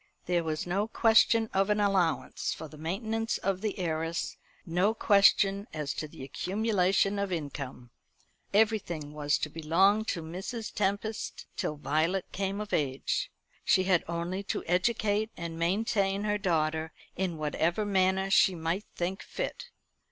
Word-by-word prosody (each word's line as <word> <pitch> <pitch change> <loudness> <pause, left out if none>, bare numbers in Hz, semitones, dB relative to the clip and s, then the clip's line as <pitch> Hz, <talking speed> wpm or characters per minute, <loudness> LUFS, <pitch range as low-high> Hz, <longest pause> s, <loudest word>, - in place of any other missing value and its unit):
There 175 -1 +1
was 155 -1 -2
no 195 +4 0
question 225 0 +4
of 195 +1 +2
an 210 0 +2
allowance 195 -5 +1
for 160 - -7
the 155 - -13
maintenance 220 +8 -2
of 190 -1 -1
the 215 -1 -2
heiress, 165 -2 -2 0.3
no 185 +5 +1
question 200 -1 +4
as 150 -2 -2
to 155 - -4
the 145 - -11
accumulation 195 - +1
of 200 -1 -1
income. 140 -6 -5 0.6
Everything 195 -8 +1
was 145 -1 +1
to - - -2
belong 170 +7 +3
to 170 -6 -2
Mrs. 190 +8 -5
Tempest 205 +2 -2
till 150 - -2
Violet 155 +6 0
came 195 +1 -2
of 210 -1 -5
age. 135 -3 0 0.3
She 185 - +4
had 185 -2 +3
only 170 +3 -2
to 200 - -3
educate 210 +3 +1
and 165 -1 -5
maintain 195 +2 +1
her 210 0 0
daughter 160 -4 0 0.2
in 180 -3 -2
whatever 160 +6 0
manner 190 -1 +2
she 190 -1 +5
might 170 +5 -2
think 185 +3 -2
fit. - - -5
185 Hz, 145 wpm, -29 LUFS, 160-205 Hz, 0.6 s, she